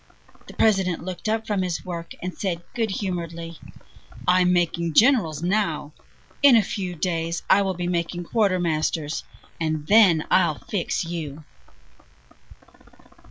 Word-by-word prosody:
"The - - -12
President 190 -6 +2
looked 185 +4 -5
up 220 0 -1
from 205 -3 -1
his 180 -2 -3
work, 170 -2 -6
and 180 0 -3
said 175 -4 -3
good 225 -2 -1
humoredly: 170 -4 -4 0.7
"'I'm 180 0 +4
making 170 -2 0
generals 185 - +3
now! 180 -6 0 0.5
In 280 -3 +8
a 225 - +5
few 185 -3 -4
days 165 0 -2
I 200 - +5
will 190 -2 -1
be 175 0 -3
making 175 0 -2
quartermasters, 170 -7 0 0.4
and 155 -2 -2
then 190 -5 +5
I'll 155 -5 +3
fix 185 -4 -2
you.'" 160 -3 -6
175 Hz, 130 wpm, -24 LUFS, 165-195 Hz, 0.7 s, In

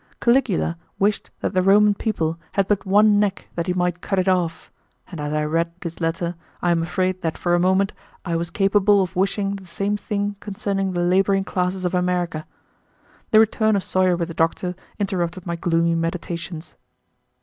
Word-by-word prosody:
Caligula 235 -9 +2 0.2
wished 205 +1 0
that - - -1
the 185 - +3
Roman 205 +2 +5
people 165 -7 -2
had 195 -1 +1
but 205 -1 0
one 205 +1 +5
neck 205 -2 -1
that 170 +1 -3
he 180 - +1
might 180 -1 -1
cut 195 - -2
it 185 0 +1
off, 180 -3 0 0.4
and 170 -4 -6
as 150 0 -3
I 150 0 0
read 165 +2 0
this 170 0 -6
letter 170 +1 -1 0.3
I 175 - +1
am 170 -1 +2
afraid 185 +2 -1
that 165 -1 -2
for 175 - 0
a 175 - +4
moment 190 +2 +2 0.3
I 170 -2 -1
was 170 0 -2
capable 200 +2 +3
of 185 +1 -6
wishing 195 +1 0
the 190 -2 -13
same 200 +4 -1
thing 205 0 -3
concerning 195 -2 -2
the 175 - -1
laboring 195 +2 +3
classes 185 0 -2
of 180 - -1
America. 180 -3 -1 0.8
The 215 - +6
return 220 0 +2
of 195 - 0
Sawyer 185 -1 +2
with 170 0 -3
the - - -6
doctor 165 +3 0 0.2
interrupted 185 -3 -2
my 170 -1 -2
gloomy 170 0 +1
meditations. 165 -1 -4
185 Hz, 185 wpm, -22 LUFS, 170-200 Hz, 0.8 s, The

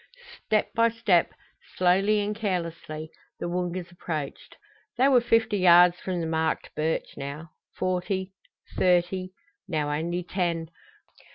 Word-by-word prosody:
Step 215 -1 +1
by 230 0 +4
step, 215 -7 +2 0.5
slowly 195 +4 +3
and 210 +1 -2
carelessly, 165 -6 -4 0.3
the - - -3
Woongas 180 0 -3
approached. 155 -5 -6 0.4
They 260 +3 +5
were 260 -3 +5
fifty 230 -2 +2
yards 175 -1 +6
from 180 -2 -3
the - - -2
marked 160 0 -1
birch 155 +1 -2
now 145 +3 -7 0.2
forty 185 +1 -2 0.5
thirty 180 +1 +2 0.4
now 155 -5 -1
only 170 +4 -2
ten. 170 -2 -2
180 Hz, 120 wpm, -26 LUFS, 165-195 Hz, 0.5 s, yards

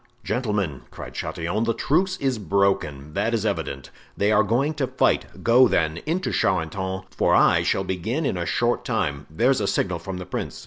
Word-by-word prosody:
"Gentlemen," 105 - -1
cried - - -9
Chatillon, 90 +7 -2
"the 115 -1 0
truce 185 +10 +1
is 130 -4 -1
broken, 80 -7 0
that 115 +7 0
is 110 -1 -2
evident; 70 -10 -3 0.3
they 100 +1 +2
are 110 0 +5
going 120 +9 +1
to 145 -4 -1
fight; - - +1 0.2
go, 125 +2 +6
then, 80 -5 +1
into 180 +4 -1
Charenton, 95 +1 -1
for - - +2
I - - +5
shall 95 - 0
begin 105 - -2
in - - 0
a 85 -2 -3
short - - +1
time—there's 80 - 0
a 100 - 0
signal 90 -3 0
from 90 +2 -6
the 90 - -6
prince!" 90 - -5
100 Hz, 180 wpm, -24 LUFS, 85-120 Hz, 0.3 s, go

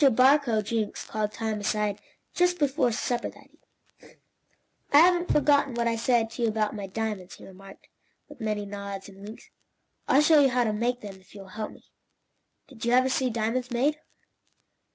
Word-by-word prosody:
Mr. 270 -5 +5
Barcoe 255 -4 +4
Jenks 220 0 -3
called 215 -1 -3
Tom 220 -1 -3
aside 205 0 -1 0.3
just 355 0 +2
before 280 -5 +1
supper 240 +2 -2
that - - -16
evening. - - -25 0.7
"I 285 - +6
haven't 350 0 +3
forgotten 285 -3 +3
what 235 0 0
I 230 - +1
said 230 -1 +1
to 240 - -7
you 230 - +2
about 215 -1 -1
my 205 -2 -6
diamonds," 205 -2 -4
he - - -14
remarked, 195 +1 -14 0.4
with 290 -4 -14
many 210 -1 -2
nods 200 -1 -7
and 195 0 -15
winks. 210 +2 -11 0.6
"I'll 280 +3 +4
show 310 0 +6
you 275 - +4
how 250 0 +1
to 220 -2 -1
make 245 +3 -1
them, 200 -2 -9
if 185 - -21
you 200 - -9
will 190 - -13
help 215 +2 -6
me. - - -17 0.8
Did 250 -5 -13
you 235 +1 +1
ever 255 +1 +4
see 260 0 0
diamonds 235 +2 -2
made?" 275 +5 0
230 Hz, 190 wpm, -26 LUFS, 210-260 Hz, 0.8 s, I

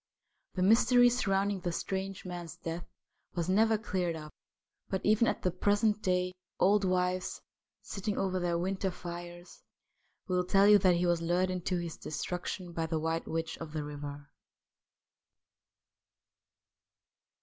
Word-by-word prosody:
The 185 - +1
mystery 245 +4 +6
surrounding 200 -4 +1
the 175 -1 -2
strange 190 +3 -4
man's 175 -2 -6
death 170 0 -5 0.5
was 170 -2 -1
never 220 +4 +4
cleared 180 -5 -2
up, 150 -1 -8 0.6
but, 190 -1 -2
even 215 +3 +4
at - - -1
the 180 - +2
present 205 +3 +2
day, 180 0 +1 0.3
old 205 +2 +4
wives, 185 0 0 0.4
sitting 205 +1 -3
over 185 -1 0
their 175 -1 0
winter 190 +2 -1
fires, 175 0 -8 0.7
will 180 -1 +1
tell 195 +2 +4
you 210 0 +8
that 185 -2 +4
he 175 +1 +1
was 175 -1 +2
lured 180 +1 0
to 180 - +1
his 170 -2 -4
destruction 180 +2 -4
by 165 -1 -1
the 160 0 -1
White 160 +1 -2
Witch 165 0 -3
of 160 -2 -7
the 155 -2 -2
River. 145 0 -7
180 Hz, 140 wpm, -31 LUFS, 170-195 Hz, 0.7 s, you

